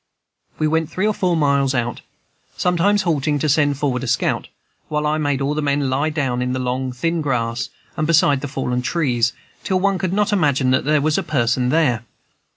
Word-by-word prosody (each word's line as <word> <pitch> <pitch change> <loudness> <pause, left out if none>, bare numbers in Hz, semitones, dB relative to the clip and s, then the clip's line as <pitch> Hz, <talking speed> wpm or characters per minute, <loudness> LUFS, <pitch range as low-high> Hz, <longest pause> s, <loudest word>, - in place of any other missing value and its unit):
We 155 - 0
went 160 0 0
three 185 +5 -1
or 215 - +2
four 180 -4 0
miles 140 -3 +2
out, 120 -1 -2 0.6
sometimes 185 +3 +2
halting 150 -4 0
to 155 - -1
send 145 -1 +2
forward 135 -4 -1
a - - -4
scout, - - 0 0.4
while 150 0 -1
I 155 +1 +1
made 145 -2 0
all 140 +2 0
the 155 - -1
men 140 -2 0
lie 140 +4 +1
down 135 -5 -1
in 125 0 -1
the 130 - -2
long, 130 +1 -2
thin 165 +7 -1
grass 120 -4 -1 0.3
and 155 - -1
beside 145 -4 +3
the 145 - -3
fallen 125 -2 -2
trees, 125 -5 +1 0.3
till 185 +5 0
one 195 0 +1
could 185 -1 -1
not 210 +2 +1
imagine 140 -8 +2
that 130 - +1
there 150 0 +3
was 155 +1 +1
a - - 0
person 125 -3 0
there. 130 -7 +2
145 Hz, 205 wpm, -20 LUFS, 130-160 Hz, 0.6 s, beside